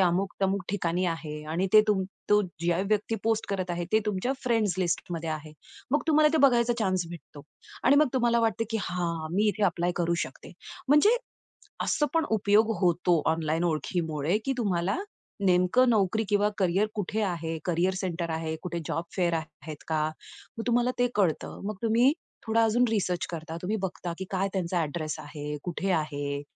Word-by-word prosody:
अमुक-तमुक 190 Hz, +2 st, +1 dB
ठिकाणी 180 Hz, -2 st, 0 dB
आहे 155 Hz, -2 st, -4 dB
आणि 185 Hz, +3 st, +1 dB
ते 215 Hz, -, +9 dB
तुम 195 Hz, -3 st, +3 dB, 0.3 s
तो 210 Hz, 0 st, +6 dB, 0.2 s
ज्या 175 Hz, 0 st, +2 dB
व्यक्ती 215 Hz, +1 st, +1 dB
पोस्ट 225 Hz, -1 st, +1 dB
करत 185 Hz, -2 st, -2 dB
आहे 175 Hz, 0 st, -2 dB
ते 220 Hz, -, +6 dB
तुमच्या 210 Hz, +5 st, 0 dB
फ्रेंड्स 225 Hz, -7 st, +2 dB
लिस्ट 175 Hz, -1 st, -1 dB
मध्ये 165 Hz, -1 st, -3 dB
आहे. 155 Hz, 0 st, -5 dB, 0.4 s
मग 295 Hz, -, +3 dB
तुम्हाला 305 Hz, 0 st, +5 dB
ते 320 Hz, -, +3 dB
बघायचा 240 Hz, -2 st, +3 dB
चान्स 185 Hz, -4 st, +1 dB
भेटतो. 150 Hz, -3 st, -11 dB, 0.4 s
आणि 275 Hz, +3 st, +6 dB
मग 300 Hz, -2 st, +5 dB
तुम्हाला 235 Hz, -2 st, +3 dB
वाटतं, 225 Hz, 0 st, +1 dB
की, 225 Hz, -, 0 dB
हां, 170 Hz, -2 st, -2 dB
मी 210 Hz, +2 st, +3 dB
इथे 210 Hz, +1 st, -1 dB
ॲप्लाय 175 Hz, -1 st, +1 dB
करू 170 Hz, 0 st, +1 dB
शकते. -, -, -12 dB, 0.4 s
म्हणजे 300 Hz, -, +6 dB, 0.7 s
असं 295 Hz, -, +1 dB
पण 325 Hz, -1 st, +2 dB
उपयोग 215 Hz, +1 st, +3 dB
होतो 175 Hz, -2 st, +3 dB
ऑनलाईन 160 Hz, +1 st, -1 dB
ओळखीमुळे, 160 Hz, +1 st, 0 dB
की 270 Hz, -, +1 dB
तुम्हाला 190 Hz, -, 0 dB, 0.5 s
नेमकं 185 Hz, +8 st, +4 dB
नोकरी 220 Hz, 0 st, +2 dB
किंवा 205 Hz, 0 st, +3 dB
करियर 190 Hz, +2 st, +2 dB
कुठे 210 Hz, +2 st, -2 dB
आहे, 165 Hz, -3 st, -2 dB
करियर 180 Hz, +2 st, +1 dB
सेंटर 170 Hz, -2 st, -3 dB
आहे, 160 Hz, 0 st, -2 dB
कुठे 175 Hz, -1 st, -3 dB
जॉब 165 Hz, -, -2 dB
फेअर 175 Hz, -3 st, +1 dB
आहेत 155 Hz, -1 st, -6 dB
का? 155 Hz, -1 st, +1 dB, 0.5 s
मग 225 Hz, -, -3 dB
तुम्हाला 245 Hz, +1 st, +2 dB
ते 245 Hz, -, +4 dB
कळतं. 185 Hz, -7 st, 0 dB
मग 215 Hz, -, -4 dB
तुम्ही 235 Hz, +4 st, +4 dB, 0.4 s
थोडा 225 Hz, +1 st, +3 dB
अजून 240 Hz, +3 st, +3 dB
रिसर्च 185 Hz, -5 st, 0 dB
करता. 160 Hz, 0 st, -6 dB
तुम्ही 200 Hz, +4 st, -1 dB
बघता, 180 Hz, -2 st, -4 dB
की 190 Hz, -, -5 dB
काय 195 Hz, 0 st, 0 dB
त्यांचा 180 Hz, -2 st, -1 dB
अ‍ॅड्रेस 155 Hz, 0 st, -3 dB
आहे, 150 Hz, 0 st, -6 dB
कुठे 185 Hz, +2 st, -3 dB
आहे? 145 Hz, -3 st, -1 dB
185 Hz, 175 wpm, -28 LUFS, 165-220 Hz, 0.7 s, ते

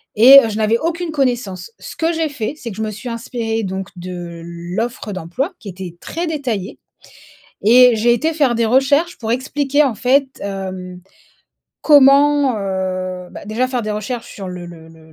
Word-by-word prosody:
et 255 Hz, +6 st, +10 dB
heu, 225 Hz, -, -1 dB
je 215 Hz, -, -4 dB
n'avais 220 Hz, +1 st, +2 dB
aucune 335 Hz, +1 st, -2 dB
connaissance. 240 Hz, -9 st, -2 dB
Ce -, -, -9 dB
que 335 Hz, 0 st, 0 dB
j'ai 320 Hz, -1 st, -1 dB
fait, 260 Hz, -4 st, -4 dB
c'est 245 Hz, -6 st, -7 dB
que -, -, -9 dB
je -, -, -4 dB
me 215 Hz, -, -3 dB
suis 230 Hz, +4 st, -7 dB
inspirée 230 Hz, -1 st, -3 dB
donc 190 Hz, 0 st, -4 dB
de 175 Hz, -1 st, -7 dB
l'offre 180 Hz, +7 st, -5 dB
d'emploi, 190 Hz, -, -3 dB
qui 205 Hz, -, -9 dB
était 185 Hz, -2 st, -8 dB
très 340 Hz, +2 st, -4 dB
détaillée 250 Hz, -, -3 dB, 0.9 s
et 245 Hz, +1 st, +7 dB
j'ai 240 Hz, +2 st, +3 dB
été 315 Hz, +7 st, 0 dB
faire 280 Hz, -6 st, +2 dB
des 230 Hz, 0 st, +1 dB
recherches 280 Hz, +8 st, +2 dB
pour 225 Hz, -1 st, -4 dB
expliquer 280 Hz, +3 st, +1 dB
en 260 Hz, -, 0 dB
fait 265 Hz, +2 st, +2 dB
hem, 185 Hz, -2 st, -6 dB, 0.8 s
comment, 285 Hz, -2 st, +5 dB
heu 185 Hz, -2 st, -3 dB
bah -, -, -10 dB
déjà 235 Hz, +4 st, -1 dB
faire 250 Hz, -2 st, -2 dB
des 215 Hz, -1 st, -3 dB
recherches 225 Hz, +3 st, -5 dB
sur 195 Hz, -2 st, -7 dB
le 180 Hz, -1 st, -7 dB
le 165 Hz, -2 st, -12 dB
le 160 Hz, -1 st, -18 dB
225 Hz, 185 wpm, -18 LUFS, 190-270 Hz, 0.9 s, et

